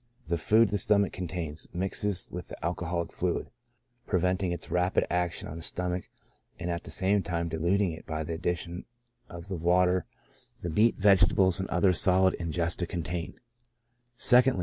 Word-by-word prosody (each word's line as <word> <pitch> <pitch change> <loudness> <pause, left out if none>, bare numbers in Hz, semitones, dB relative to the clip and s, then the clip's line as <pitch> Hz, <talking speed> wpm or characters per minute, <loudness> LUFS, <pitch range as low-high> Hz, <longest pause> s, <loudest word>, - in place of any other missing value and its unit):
The 85 - 0
food 110 +5 +4
the 105 +1 -1
stomach 100 0 +2
contains 85 -3 -5
mixes 95 0 -1
with 90 -1 -7
the - - -8
alcoholic 85 0 -3
fluid, 90 -1 -2 0.6
preventing 90 0 0
its 85 - -6
rapid 90 +1 +1
action 90 -1 -1
on 80 - -8
the - - -8
stom 90 +2 -3
ach, 90 - -12 0.5
and 85 0 -4
at 85 0 -4
the - - -9
same 100 +2 +2
time 85 -1 -3
diluting 85 +4 0
it 80 - -11
by 80 0 -3
the 80 - -5
addition 85 +1 -4 0.4
of 85 +1 -10
the 95 -3 -4
water 90 +2 +2 0.6
the 85 - -3
meat, 110 +8 +3
vegetables, 95 -2 +4
and 95 - -4
other 90 +1 +3
solid 95 +2 +6
ingesta 85 +1 -1
contain, 85 0 -5 0.8
2ndly. 125 -3 +4
90 Hz, 165 wpm, -28 LUFS, 85-95 Hz, 0.8 s, solid